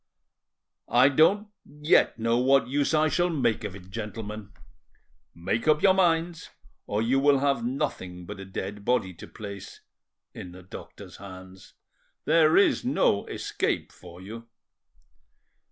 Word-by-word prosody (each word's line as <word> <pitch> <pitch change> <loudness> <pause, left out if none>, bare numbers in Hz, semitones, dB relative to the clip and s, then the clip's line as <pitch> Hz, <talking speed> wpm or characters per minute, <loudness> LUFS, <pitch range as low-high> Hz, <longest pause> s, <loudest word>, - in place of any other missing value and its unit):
"I 125 +3 +5
don't 190 +9 +3
yet 150 -2 +2
know 115 +1 +1
what 135 +2 +3
use 140 +2 0
I 155 0 +3
shall 175 +4 +1
make 120 -9 0
of 100 -3 -5
it, 95 -1 -13
gentlemen. 105 -1 -6 0.8
Make 90 - -2
up 155 +3 +3
your 190 -2 +6
minds, 170 -2 +1 0.4
or 105 +2 -1
you 130 +4 +2
will 140 0 +4
have 135 -3 0
nothing 95 -8 -4
but 105 +2 -8
a 95 - -7
dead 100 +2 -6
body 100 -6 0
to 85 - -12
place—in 100 -3 -12
the 90 0 -12
doctor's 90 - -11
hands. 95 -1 -12 0.5
There 160 0 +4
is 200 - +3
no 245 - +1
escape - - -2
for 90 -1 -14
you." 115 +4 -9
115 Hz, 135 wpm, -26 LUFS, 100-150 Hz, 0.8 s, your